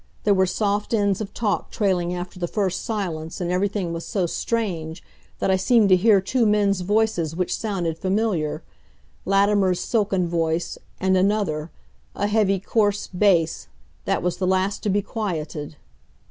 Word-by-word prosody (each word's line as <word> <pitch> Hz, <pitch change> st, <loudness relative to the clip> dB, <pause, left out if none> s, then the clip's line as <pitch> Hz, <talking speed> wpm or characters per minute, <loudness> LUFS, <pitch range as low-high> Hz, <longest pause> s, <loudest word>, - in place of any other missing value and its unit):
There 205 Hz, -, +4 dB
were 190 Hz, -1 st, +3 dB
soft 205 Hz, +3 st, 0 dB
ends 200 Hz, -2 st, +1 dB
of 210 Hz, -, -5 dB
talk 205 Hz, -7 st, -1 dB
trailing 185 Hz, -5 st, 0 dB
after 180 Hz, +1 st, -6 dB
the 175 Hz, -, -1 dB
first 190 Hz, -1 st, -1 dB
silence, 175 Hz, -8 st, -4 dB
and 175 Hz, -1 st, -2 dB
everything 190 Hz, -1 st, -1 dB
was 165 Hz, 0 st, -5 dB
so 190 Hz, -4 st, -1 dB
strange 170 Hz, -5 st, -3 dB, 0.3 s
that -, -, 0 dB
I 190 Hz, -, +3 dB
seemed 210 Hz, +2 st, +3 dB
to 185 Hz, -, +7 dB
hear 200 Hz, +2 st, +5 dB
two 230 Hz, +5 st, +1 dB
men's 200 Hz, -2 st, +2 dB
voices 190 Hz, -5 st, 0 dB
which 180 Hz, 0 st, -1 dB
sounded 175 Hz, -7 st, -2 dB
familiar 190 Hz, -5 st, -1 dB, 0.6 s
Latimer's 195 Hz, -2 st, +3 dB
silken 200 Hz, -5 st, 0 dB
voice, 165 Hz, 0 st, -1 dB, 0.2 s
and 190 Hz, 0 st, +2 dB
another, 185 Hz, -5 st, +1 dB, 0.5 s
a 205 Hz, -, -1 dB
heavy, 205 Hz, -2 st, +2 dB
coarse 205 Hz, +1 st, +1 dB
bass, 180 Hz, -4 st, +1 dB, 0.4 s
that -, -, 0 dB
was 180 Hz, 0 st, -1 dB
the 185 Hz, 0 st, -1 dB
last 190 Hz, +2 st, +1 dB
to 210 Hz, -, -1 dB
be 200 Hz, +1 st, +1 dB
quieted. 160 Hz, -9 st, -4 dB
190 Hz, 160 wpm, -23 LUFS, 175-205 Hz, 0.6 s, to